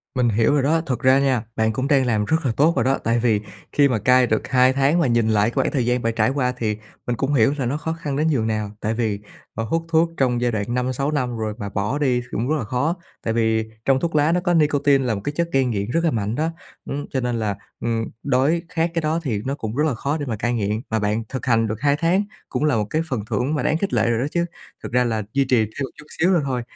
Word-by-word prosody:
Mình 125 -2 +2
hiểu 115 +5 +2
rồi 140 -3 +2
đó, 160 +3 +2
thật 125 -3 -2
ra 130 +1 +5
nha, 130 -5 +1
bạn 110 0 +1
cũng 130 +4 -1
đang 140 -3 +3
làm 110 -4 +1
rất 160 +4 0
là 120 - +2
tốt 160 +4 +4
rồi - - +2
đó, 135 +1 +2
tại 115 +1 +2
vì 110 -3 +2 0.3
khi 145 -1 +4
mà 120 -5 0
cai 125 +1 +4
được 110 - 0
2 130 0 +4
tháng 140 +5 +2
mà 155 - +3
nhìn 115 -2 +2
lại 105 +1 +3
cái - - -10
khoảng - - +1
thời 130 -6 0
gian 125 0 +1
bạn 115 0 0
trải 110 +1 +3
qua, 130 -2 0
thì 105 -3 -1 0.3
mình 120 - 0
cũng 135 +4 -1
hiểu 135 +1 +4
là 130 - -1
nó 140 +5 -1
khó 160 +1 -3
khăn 150 -4 -4
đến 155 +3 +1
nhường 120 -8 +1
nào. 110 -2 -2
Tại 110 +1 -1
vì, 110 -3 -1 0.3
ờ, 115 - -3
hút 165 +8 -1
thuốc 165 0 +3
trong 125 -2 +1
giai 120 -1 +1
đoạn 105 -2 -1
5-6 130 +3 -1
năm 125 -5 -1
rồi 110 -1 -2
mà 100 - -5
bỏ 105 +7 -1
đi 130 -4 +1
thì 120 - -14
cũng 120 +6 -2
rất 155 - +2
là 130 - -2
khó. 130 - -1 0.3
Tại 115 - -1
vì 110 -1 +2 0.2
trong 135 -1 +3
thuốc 165 0 -2
lá 150 +2 +4
nó 180 - +2
có 175 -1 0
nicotine 145 -3 +3
là 115 -3 0
một 100 - -5
cái 145 - -2
chất 170 0 0
gây 135 -1 +3
nghiện 105 -4 -2
rất 165 +1 +1
là 165 - +2
mạnh 110 0 -1
đó, 160 +3 0 0.3
ưm, 145 +1 -4
cho 130 - -1
nên 120 -1 -1
là, 105 -2 -1 0.2
ừm, 115 -1 -1 0.2
đói 140 +5 +2
khát 165 0 0
cái 165 - 0
đó 155 +2 0
thì 110 -7 -1
nó 135 - -1
cũng 110 -4 -5
rất 150 - +2
là 145 - 0
khó 140 +6 -2
để 145 - -4
mà 115 -4 -2
cai 120 +3 -1
nghiện, 105 0 -1
mà 110 - 0
bạn 105 +2 0
thực 130 - -5
hành 115 -2 +3
được 110 +2 -4
2 145 -1 +3
tháng 170 +6 +2 0.3
cũng - - -2
là 150 -5 +2
một 105 -2 0
cái 155 +6 0
phần 125 -5 -1
thưởng 125 +7 0
mà 150 - -1
đáng 155 - +2
khích 195 +3 -2
lệ - - +2
rồi 115 -1 +1
đó 130 - 0
chứ. 170 0 +1 0.4
Thực - - -6
ra 125 +1 +3
là 110 -3 -1
duy 140 -1 +2
trì 125 -1 +3
thêm 110 +5 -2
một 135 - -3
chút 150 - -12
xíu 180 +3 +4
nữa 170 - +3
thôi 125 -2 -1
125 Hz, 295 wpm, -22 LUFS, 115-145 Hz, 0.4 s, ra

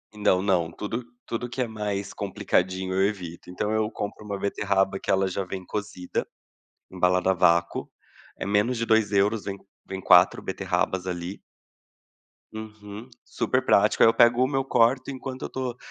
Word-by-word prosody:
Não 95 -3 +2
não, 90 -4 +1
tudo 115 +7 -5 0.2
tudo 120 +1 -3
que 125 +2 -4
é 120 - 0
mais 105 -2 -3
complicadinho, 95 -1 -1
eu 95 +1 +3
evito. 90 -4 -7
Então 105 +4 -2
eu 110 0 0
compro 105 +1 -6
uma 100 -1 -4
beterraba 95 -1 0
que - - -2
ela 95 0 +2
já 95 +1 -2
vem 95 0 -6
cozida, 90 -3 -4 0.6
embalada 90 0 +2
à - - +3
vácuo. 85 0 +2 0.5
É - - -5
menos 105 +5 +1
de 115 - -1
2€, 105 -1 +2
vem 100 -1 -4 0.3
vem 95 0 -5
4 90 -1 +5
beterrabas 95 0 -1
ali. 90 +2 -5 1.1
Uhum. 110 +1 -9
Super - - -1
prático - - +3
aí 115 - +8
eu - - +2
pego 120 +1 +5
uma, 135 +1 0
eu 135 - 0
corto 125 +2 +2
enquanto 130 0 -6
eu - - -4
tô 125 -2 -4
100 Hz, 165 wpm, -26 LUFS, 95-115 Hz, 1.1 s, aí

